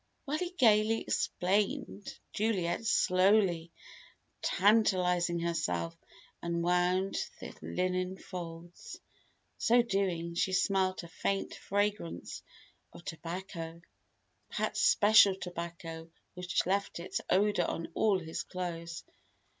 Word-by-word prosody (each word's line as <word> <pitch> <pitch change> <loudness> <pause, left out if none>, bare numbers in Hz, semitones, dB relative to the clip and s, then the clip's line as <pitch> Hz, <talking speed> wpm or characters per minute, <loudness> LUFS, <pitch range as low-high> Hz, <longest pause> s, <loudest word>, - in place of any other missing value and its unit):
While 300 +2 -1
he 360 - -2
gaily 225 - +4
explained, 200 +2 -1 0.2
Juliet 205 -1 0
slowly 185 -4 +3 0.7
tantalizing 180 -4 +3
herself 120 - -1 0.5
unwound 180 +2 +1 0.2
the - - -8
linen 185 +1 -1
folds. 170 -2 -8 0.6
So 240 +1 +4
doing, 185 -6 -1
she 185 +2 0
smelt 185 -1 +1
a - - -8
faint 195 +4 -2
fragrance 205 -3 -2 0.5
of 170 - -13
tobacco 170 0 -6 0.7
Pat's - - -1
special 215 - +6
tobacco 170 -2 -7 0.2
which 180 -1 -1
left 200 0 -1
its 170 - -3
odour 200 -2 +3
on 165 - -3
all 205 +1 +3
his 165 -3 -4
clothes. 170 -2 -5
185 Hz, 100 wpm, -31 LUFS, 170-200 Hz, 0.7 s, special